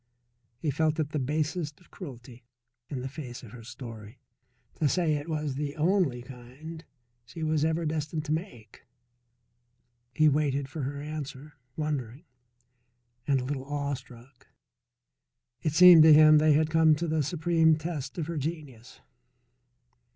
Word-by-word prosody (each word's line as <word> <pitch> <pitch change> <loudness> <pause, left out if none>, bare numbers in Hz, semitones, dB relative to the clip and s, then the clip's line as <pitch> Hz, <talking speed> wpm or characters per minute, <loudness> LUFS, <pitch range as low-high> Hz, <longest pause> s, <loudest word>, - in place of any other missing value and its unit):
He 150 +3 -2
felt 155 +2 0
it 150 -2 -1
the 150 - -1
basest 150 +3 -2
cruelty, 125 -7 -11 0.5
in 130 -3 -4
the 130 - -4
face 130 -3 -8
of 115 - -12
her 120 0 -11
story, 115 -2 -10 0.6
to 150 - +2
say 170 -2 +1
it 145 +2 -4
was 150 -3 -2
the 145 +1 -4
only 160 -7 +1
kind 135 +6 -11 0.4
she 160 +7 -8
was 155 -1 +1
ever 160 +1 0
destined 155 0 -3
to 150 - -4
make. 155 - -6 1.2
He 155 +5 +3
waited 140 -2 +1
for 155 +2 -6
her 140 +2 -4
answer, 145 -1 -7 0.2
wondering, 145 -3 -3 1.0
and 135 -3 +2
a - - -5
little 135 -1 -4
awestruck. 140 -3 -6 1.1
It 155 - -1
seemed 180 0 +9
to 155 0 +8
him 155 0 +7
they 155 0 +4
had 155 +1 +2
come 160 -1 +5
to 170 +3 -3
the 155 -1 +1
supreme 160 +1 +2
test 155 -3 -5
of 165 - -2
her 165 0 -5
genius. 145 -6 -6
150 Hz, 145 wpm, -28 LUFS, 130-160 Hz, 1.2 s, seemed